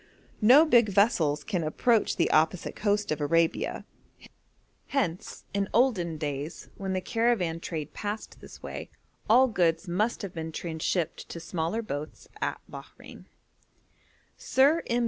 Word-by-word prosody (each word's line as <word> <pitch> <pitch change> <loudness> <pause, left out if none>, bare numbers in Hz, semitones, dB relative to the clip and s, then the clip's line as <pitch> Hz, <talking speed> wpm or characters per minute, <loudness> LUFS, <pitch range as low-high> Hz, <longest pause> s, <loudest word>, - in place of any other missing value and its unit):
No 260 +9 +7
big 240 -8 +4
vessels 170 -8 +2
can 180 -6 -2
approach 220 +8 +1
the - - +1
opposite 160 +3 +1
coast 205 -2 0
of 155 - -2
Arabia; 165 +3 0 1.0
hence, 185 -11 -3
in 200 -1 -1
olden 195 -10 +2
days, 145 0 -5
when 195 -1 -4
the 185 - -1
caravan 215 -8 0
trade 160 -3 -5
passed 210 +1 -6
this - - -13
way, - - -7 0.4
all 255 +4 +6
goods 175 -5 +1
must 210 +7 -1
have 195 - -6
been 160 -1 -5
transhipped 165 +1 -3
to 170 - -6
smaller 170 +6 -3
boats 150 -6 -6
at - - -2
Bahrein. - - -12 1.1
Sir 285 +5 +3
M. 240 0 +1
185 Hz, 135 wpm, -28 LUFS, 160-225 Hz, 1.1 s, No